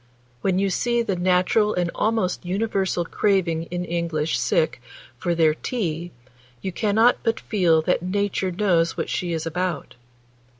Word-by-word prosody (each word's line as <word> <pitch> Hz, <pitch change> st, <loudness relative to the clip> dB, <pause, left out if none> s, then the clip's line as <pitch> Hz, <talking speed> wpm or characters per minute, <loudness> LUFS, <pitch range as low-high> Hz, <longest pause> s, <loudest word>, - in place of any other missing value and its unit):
When 185 Hz, +4 st, +1 dB
you 195 Hz, 0 st, +1 dB
see 235 Hz, +4 st, +1 dB
the 200 Hz, -4 st, -1 dB
natural 185 Hz, +4 st, +2 dB
and 175 Hz, -1 st, 0 dB
almost 215 Hz, -5 st, 0 dB
universal 190 Hz, -2 st, -1 dB
craving 170 Hz, -4 st, +1 dB
in 180 Hz, 0 st, -3 dB
English 165 Hz, -2 st, -1 dB
sick 485 Hz, -1 st, +1 dB, 0.3 s
for 175 Hz, -1 st, -1 dB
their 160 Hz, -2 st, +4 dB
'tea,' 170 Hz, -4 st, -3 dB, 0.5 s
you 190 Hz, -, -4 dB
cannot 220 Hz, +5 st, +3 dB
but 225 Hz, -1 st, 0 dB
feel 170 Hz, -7 st, +2 dB
that 180 Hz, -, +1 dB
Nature 195 Hz, +1 st, -1 dB
knows 175 Hz, -3 st, +1 dB
what -, -, -2 dB
she 175 Hz, -1 st, -2 dB
is 160 Hz, -1 st, -2 dB
about. 180 Hz, +2 st, -3 dB
180 Hz, 145 wpm, -23 LUFS, 170-205 Hz, 0.5 s, their